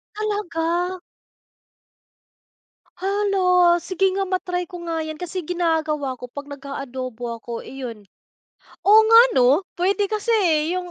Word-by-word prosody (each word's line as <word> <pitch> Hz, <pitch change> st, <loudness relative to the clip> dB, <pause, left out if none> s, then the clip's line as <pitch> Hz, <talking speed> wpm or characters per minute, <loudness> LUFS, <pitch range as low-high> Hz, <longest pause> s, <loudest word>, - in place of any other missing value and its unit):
Talaga. 360 Hz, -4 st, -2 dB, 2.0 s
Hala, 375 Hz, -2 st, +3 dB
sige 385 Hz, +1 st, 0 dB
nga, 390 Hz, -, 0 dB
ma-try 365 Hz, -1 st, -2 dB
ko 355 Hz, -, -7 dB
nga 325 Hz, -1 st, -2 dB
'yan. 315 Hz, -1 st, -6 dB
Kasi 360 Hz, +2 st, -5 dB
ginagawa 315 Hz, -5 st, -1 dB
ko 250 Hz, -1 st, -10 dB
'pag 285 Hz, +2 st, -8 dB
nag-aadobo 260 Hz, -4 st, -6 dB
ako, 235 Hz, -1 st, -5 dB
iyon, 240 Hz, -6 st, -8 dB, 0.8 s
oo 425 Hz, +2 st, +8 dB
nga 455 Hz, 0 st, +8 dB
ano, 265 Hz, +8 st, +4 dB
puwede 390 Hz, +3 st, 0 dB
kasi, 425 Hz, +2 st, -4 dB, 0.4 s
eh, 355 Hz, -, -1 dB
345 Hz, 115 wpm, -22 LUFS, 280-380 Hz, 2.0 s, oo